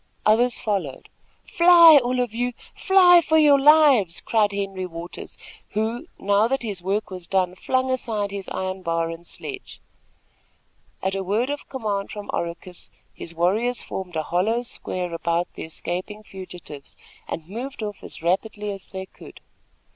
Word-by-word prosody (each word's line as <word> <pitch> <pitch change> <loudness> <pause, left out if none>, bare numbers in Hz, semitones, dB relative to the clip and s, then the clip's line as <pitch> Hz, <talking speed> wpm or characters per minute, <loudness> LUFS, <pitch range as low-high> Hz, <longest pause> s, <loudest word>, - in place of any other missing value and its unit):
Others 235 +3 +3
followed. 190 -11 -3 0.4
"Fly! 335 -3 +8
all 250 +1 -1
of 245 -3 -1
you! 245 +1 -1 0.2
Fly 360 -3 +6
for 315 - +2
your 295 -3 +6
lives!" 275 - +5
cried 215 -2 +1
Henry 195 -2 -3
Waters, 170 0 -9 0.4
who, 225 +8 -2
now 205 +2 +2
that 270 +1 -1
his 205 -5 -4
work 195 +3 -2
was 180 -2 -8
done, 185 -2 +1
flung 260 +7 -1
aside 215 -5 -2
his 200 -1 -6
iron 190 0 -4
bar 165 -1 -1
and 170 +1 -10
sledge. 395 -2 -9 1.2
At 190 - 0
a 195 0 -2
word 220 +8 0
of 290 - -6
command 210 -7 -3
from 210 -1 -7
Oracus 170 +1 -6 0.2
his 170 - -9
warriors 215 +9 +1
formed 180 -3 -6
a 155 - -1
hollow 215 +9 0
square 180 -7 -5
about 170 +1 -1
the - - -7
escaping 185 +6 -5
fugitives, 180 -8 -10 0.3
and 160 -1 -6
moved 240 +5 -6
off 210 -1 -6
as - - -10
rapidly 205 +4 -1
as 195 -1 -8
they 190 0 -7
could. - - -15
205 Hz, 155 wpm, -23 LUFS, 180-245 Hz, 1.2 s, Fly